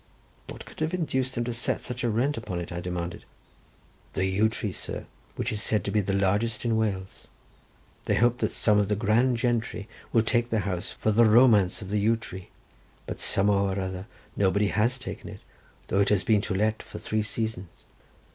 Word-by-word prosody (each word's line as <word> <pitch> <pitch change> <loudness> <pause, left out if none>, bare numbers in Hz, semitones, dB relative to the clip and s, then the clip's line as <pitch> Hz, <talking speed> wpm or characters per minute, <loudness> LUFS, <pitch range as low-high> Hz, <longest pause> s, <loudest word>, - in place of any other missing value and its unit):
"What - - -8
could - - -13
have 155 +3 0
induced 130 -6 -1
them 120 - 0
to 120 0 -3
set 120 - -1
such 125 0 -5
a 120 - +2
rent 125 +7 +1
upon 90 -6 -4
it?" 85 - -6
I 85 0 -4
demanded. 90 -1 -4 0.9
"The 95 - 0
yew 100 +4 +2
tree, 110 -2 -3
sir, - - -5 0.3
which - - -2
is 105 - -2
said 105 -1 +1
to 100 - -2
be 105 +1 +2
the 100 - -2
largest 105 +4 +1
in 115 -1 +2
Wales. 100 -4 -2 0.8
They - - +2
hope 120 +1 +3
that - - +1
some 105 -2 +3
of 100 - +2
the 105 - +1
grand 115 +4 +2
gentry 115 -3 -1 0.2
will 115 - +4
take 120 +1 +1
the 110 -2 +1
house 90 -2 -3
for 110 - 0
the 115 +2 +5
romance 110 -3 +5
of 95 - -8
the 105 - +1
yew 110 +3 +3
tree, 95 -4 -9 0.6
but - - -6
somehow 100 0 +2
or 95 0 -1
other 95 +1 -4 0.3
nobody 100 +1 +2
has 115 +5 +1
taken - - -7
it, - - -10 0.5
though 100 - +2
it 100 - +2
has 105 -2 +3
been 110 -5 +3
to 105 -2 -2
let 110 +2 +1
for - - -10
three 110 0 -1
seasons." 105 -3 -4
105 Hz, 205 wpm, -27 LUFS, 100-115 Hz, 0.9 s, the